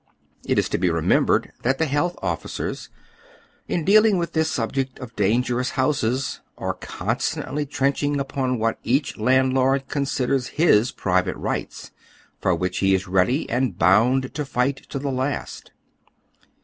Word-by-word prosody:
It - - 0
is - - +2
to - - -1
be 90 0 +2
re 85 -1 -1
membered - - +2
that 130 +2 +1
the 160 - +1
health 150 +5 0
officers, - - -4 0.8
in 170 -3 -1
dealing 215 +1 +5
with 170 -2 -2
this 160 -1 +1
subject 130 +2 -2
of 115 -3 -10
dangerous 120 +5 +1
houses, 130 -1 0 0.2
are - - -2
constantly 145 +1 -3
trenching 140 +1 0
upon 135 -2 -1
what 115 0 -1
each 135 +4 0
landlord 130 +3 +2
considers 135 -2 0
his 125 -8 +4
private 90 -1 0
rights, - - -4 0.5
for - - +1
which 90 0 -2
lie 95 - +2
is 95 0 +2
ready 95 - +1
and 120 -6 -1
bound 120 +9 +3
to 150 - -2
fight 135 0 0
to - - -4
the 140 0 -2
last. 130 +2 -3
130 Hz, 150 wpm, -23 LUFS, 115-140 Hz, 0.8 s, dealing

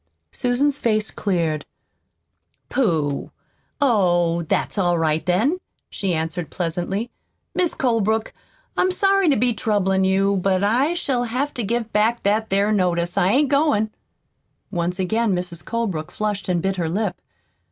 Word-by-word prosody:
Susan's 270 - +1
face 215 -2 +1
cleared. 165 -7 -1 1.1
"Pooh! 160 - 0 0.5
Oh, 175 - +2
that's 170 +5 -1
all 175 -2 +2
right 160 -1 +1
then," 225 - +1 0.3
she 190 -4 -1
answered 165 +1 -3
pleasantly. 180 +6 -2 0.4
"Mis' 360 -2 0
Colebrook, 220 -3 0 0.4
I'm 370 - +2
sorry 390 -1 +3
to 280 - +4
be 245 +2 +2
troublin' 195 -3 +1
you, 195 +1 +2
but 190 0 +1
I 255 +11 +2
shall 255 -7 0
have 255 +5 -2
to 245 - -3
give 225 +1 -2
back 225 +3 +2
that 215 +2 +1
'ere 200 +2 +2
notice. 175 -3 +1
I 180 - +3
ain't 275 +6 +3
goin'." 280 -7 +2 0.8
Once 175 -1 -1
again 205 +2 +1
Mrs. 175 -1 -4
Colebrook 200 -10 -2
flushed 210 -2 -3
and 175 -2 0
bit 190 0 0
her 170 -2 -1
lip. 200 +2 -2
205 Hz, 140 wpm, -22 LUFS, 180-235 Hz, 1.1 s, to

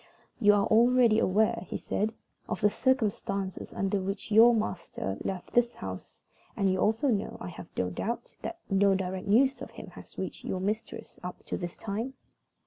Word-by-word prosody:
"You 205 -3 +6
are 200 -1 +3
already 235 0 +5
aware," 210 +1 +2
he - - -3
said, 215 +2 -1 0.4
"of - - -3
the 210 -1 +4
circumstances 205 -7 0
under 195 0 0
which 195 +3 -4
your 225 +3 +8
master 175 - -3
left 185 -2 -4
this 240 0 +3
house, 95 -1 -7 0.3
and 195 -2 +3
you 185 - 0
also 225 +8 +2
know, 210 -4 -1
I - - -6
have 175 -1 -9
no 90 0 0
doubt, 230 - -4
that 340 - -5
no 195 0 +4
direct 190 +1 -3
news 260 +6 +4
of - - -6
him - - -10
has - - -13
reached - - -5
your 185 - -2
mistress 210 +4 -4
up 180 0 -7
to - - -3
this 175 -2 -5
time?" 225 +6 -4
205 Hz, 180 wpm, -29 LUFS, 190-225 Hz, 0.4 s, your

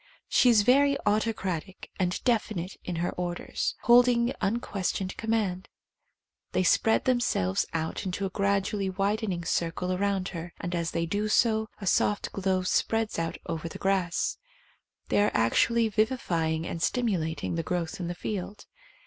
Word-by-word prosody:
She 250 - +4
is 220 -3 +5
very 280 +4 +4
autocratic 205 -4 -1
and 180 -1 -1
definite 210 -6 0
in 180 - -4
her 170 +1 -1
orders, 175 -1 -3
holding 240 0 +5
unques 200 -2 -1
tioned 190 -1 -4
command. 215 -5 -1 0.8
They 185 - +2
spread 225 +5 +3
themselves 240 - +1
out 160 0 -3
into 195 +1 -2
a 190 - -3
gradually 200 0 0
widening 195 -2 -1
circle 170 +2 -1
around 195 0 0
her, 175 -1 -7
and 175 - -4
as 170 -1 -1
they 170 0 -1
do 205 +5 -1
so, 220 0 +2
a 200 - -6
soft 205 +2 +1
glow 190 -1 0
spreads 225 +2 0
out 165 0 -2
over 165 0 -4
the - - -8
grass. 190 -3 0 0.7
They - - +3
are 210 - +4
actually 225 - +3
vivi 220 +4 +1
fying 160 -5 -1
and 165 - -5
stimulating 185 -11 -1
the 165 - -1
growth 170 0 -3
in 175 - -3
the 175 - -4
field. 200 +2 -5
195 Hz, 155 wpm, -28 LUFS, 175-220 Hz, 0.8 s, is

